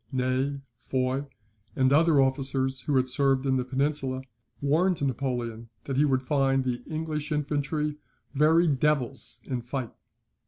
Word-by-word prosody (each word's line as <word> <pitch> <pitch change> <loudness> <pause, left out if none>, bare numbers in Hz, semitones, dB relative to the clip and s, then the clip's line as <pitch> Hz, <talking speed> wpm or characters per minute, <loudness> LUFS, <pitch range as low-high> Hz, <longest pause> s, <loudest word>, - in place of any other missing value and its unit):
Ney, 130 +2 0 0.2
Foy, 130 +1 -1 0.5
and 130 0 +3
other 160 -1 +5
officers 135 -1 +1
who 145 +2 -1
had 130 0 +3
served 135 0 +2
in 130 -1 +2
the 125 - 0
Peninsula, 135 0 -1 0.4
warned 165 +6 +2
Napoleon 120 -3 -3
that 135 - -3
he 145 +3 +4
would 130 -2 +1
find 135 0 +2
the 125 -1 -2
English 155 -1 -3
infantry 150 0 -1 0.4
"very 155 +4 +4
devils 140 -3 0
in 125 -2 -3
fight." 125 0 -5
135 Hz, 140 wpm, -27 LUFS, 130-150 Hz, 0.5 s, other